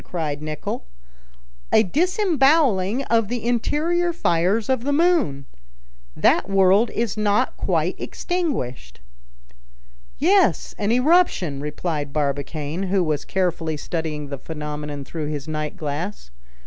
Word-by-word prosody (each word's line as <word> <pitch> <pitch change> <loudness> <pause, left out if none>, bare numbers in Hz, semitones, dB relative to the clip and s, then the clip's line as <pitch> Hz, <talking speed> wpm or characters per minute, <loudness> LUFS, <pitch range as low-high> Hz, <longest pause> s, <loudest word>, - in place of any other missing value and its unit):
cried 150 -4 -3
Nicholl; 155 - -5 0.8
"a - - +6
disemboweling 280 - +2
of 230 -4 +1
the 240 +1 -4
interior 315 +9 +1
fires 200 - +1
of 260 -3 0
the 285 - 0
moon! 285 - +2 0.7
That - - +3
world 195 +3 +4
is 230 -3 -2
not 210 +4 +1
quite - - -1
extinguished." 175 - -3 1.2
"Yes, 380 +6 +3
an 205 +1 +1
eruption," 250 - +3
replied 150 -1 -3
Barbicane, 150 +4 -2
who 190 -1 +2
was 155 -3 -1
carefully 170 -4 -1
studying 150 -2 -4
the 140 -2 -5
phenomenon 150 -2 -6
through 155 0 -5
his 150 -1 -5
night 155 -1 -4
glass. 150 - -5
185 Hz, 115 wpm, -22 LUFS, -, 1.2 s, a